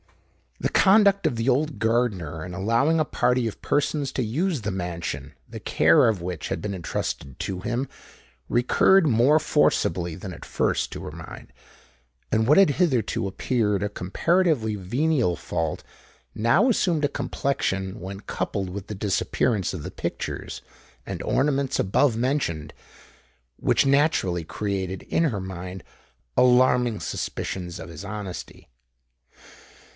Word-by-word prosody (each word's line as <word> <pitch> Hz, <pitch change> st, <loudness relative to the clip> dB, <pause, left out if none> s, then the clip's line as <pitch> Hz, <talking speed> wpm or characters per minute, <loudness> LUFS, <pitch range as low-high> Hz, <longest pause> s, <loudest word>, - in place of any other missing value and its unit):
The -, -, 0 dB
conduct 200 Hz, 0 st, +5 dB
of -, -, -1 dB
the 115 Hz, +2 st, -2 dB
old 145 Hz, +4 st, +1 dB
gardener 100 Hz, -10 st, 0 dB
in 90 Hz, -1 st, -7 dB
allowing 115 Hz, -, +2 dB
a 155 Hz, -, +2 dB
party 125 Hz, -3 st, +1 dB
of 110 Hz, -, -7 dB
persons 145 Hz, -1 st, 0 dB
to 130 Hz, -, 0 dB
use 150 Hz, -, -1 dB
the 105 Hz, -1 st, -2 dB
mansion, 90 Hz, -2 st, -4 dB
the -, -, -8 dB
care 80 Hz, +9 st, +4 dB
of 105 Hz, -6 st, 0 dB
which 90 Hz, -4 st, -4 dB
had -, -, -2 dB
been 105 Hz, -1 st, -3 dB
entrusted 80 Hz, -6 st, -4 dB
to 95 Hz, -2 st, -3 dB
him, 120 Hz, +7 st, -2 dB, 0.6 s
recurred 160 Hz, +9 st, +4 dB
more 130 Hz, +4 st, +4 dB
forcibly 85 Hz, -, +1 dB
than 95 Hz, +1 st, -7 dB
at -, -, -10 dB
first -, -, 0 dB
to -, -, -7 dB
her 75 Hz, -, -6 dB
mind: 80 Hz, 0 st, -10 dB, 0.8 s
and 110 Hz, +1 st, +2 dB
what 150 Hz, -, +6 dB
had 195 Hz, -6 st, +6 dB
hitherto 130 Hz, -, +1 dB
appeared 105 Hz, 0 st, 0 dB
a 105 Hz, -, -1 dB
comparatively 125 Hz, -, +1 dB
venial 120 Hz, -, +1 dB
fault, 80 Hz, -3 st, -3 dB, 0.5 s
now 115 Hz, -, +3 dB
assumed 175 Hz, -9 st, +2 dB
a -, -, +1 dB
complexion, 95 Hz, -10 st, -2 dB
when 95 Hz, +2 st, -7 dB
coupled 100 Hz, -2 st, -3 dB
with 100 Hz, +1 st, -6 dB
the 105 Hz, -, -5 dB
disappearance 100 Hz, +1 st, 0 dB
of 90 Hz, -, -5 dB
the -, -, -6 dB
pictures -, -, -5 dB, 0.4 s
and -, -, -5 dB
ornaments 140 Hz, -1 st, +1 dB
above 110 Hz, +5 st, +2 dB
mentioned, 120 Hz, -, -1 dB, 0.8 s
which -, -, +2 dB
naturally 135 Hz, -, +2 dB
created 95 Hz, +1 st, -3 dB
in 165 Hz, -, +1 dB
her 110 Hz, -10 st, -1 dB
mind 95 Hz, 0 st, -7 dB, 0.5 s
alarming 125 Hz, -2 st, +4 dB
suspicions 90 Hz, -1 st, -4 dB
of 80 Hz, -, -8 dB
his 85 Hz, +1 st, -9 dB
honesty. 100 Hz, -3 st, -7 dB
110 Hz, 140 wpm, -25 LUFS, 95-140 Hz, 0.8 s, what